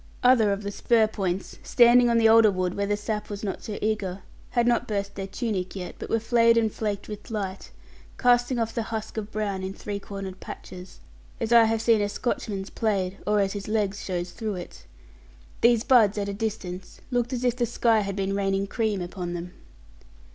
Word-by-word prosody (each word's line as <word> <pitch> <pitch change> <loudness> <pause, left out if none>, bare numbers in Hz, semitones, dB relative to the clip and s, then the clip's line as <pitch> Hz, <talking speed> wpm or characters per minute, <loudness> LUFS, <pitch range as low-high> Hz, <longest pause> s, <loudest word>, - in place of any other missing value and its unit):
Other 245 -5 +5
of 200 +1 -2
the 200 - -3
spur 225 +2 +3
points, 195 -3 -3
standing 240 0 +5
on 235 - +3
the 225 -1 +5
older 225 -1 +7
wood 185 -2 -1
where 200 +1 -1
the 205 0 0
sap 210 0 -4
was 205 0 -6
not 195 -2 -3
so 210 - -5
eager, 200 -3 -2 0.3
had 240 -1 +1
not 240 0 +2
burst 200 -1 -2
their 195 -1 -5
tunic 195 -3 -3
yet, 180 -2 -6
but - - -6
were 225 - +2
flayed 230 0 +4
and 220 -2 +2
flaked 205 -2 -3
with 210 -1 -8
light, 195 -4 -4 0.5
casting 245 0 +3
off 225 -1 -1
the 230 - -1
husk 220 -1 -4
of 215 -1 -4
brown 205 -3 -2
in 190 +1 -5
three 205 -1 -5
cornered 195 -2 -7
patches, 180 0 -10 0.4
as 230 0 0
I 230 -1 +8
have 225 0 0
seen 225 -3 +4
a 205 - 0
Scotchman's 205 -3 -3
plaid, 195 -4 -1
or 210 0 +3
as 195 -1 0
his 200 -1 -6
legs 205 -2 -1
shows 175 -1 -3
through 220 -3 -4
it. 175 -1 -9 0.7
These 235 -1 +4
buds, 225 -7 +5
at 200 -1 -1
a 200 - -3
distance, 200 -4 -5
looked 245 0 0
as 250 -1 -3
if 245 -1 +2
the 240 -1 0
sky 225 0 +2
had 200 -2 -3
been 195 0 -1
raining 195 0 0
cream 210 -2 -1
upon 175 -1 -5
them. 175 +1 -6
210 Hz, 205 wpm, -26 LUFS, 195-225 Hz, 0.7 s, I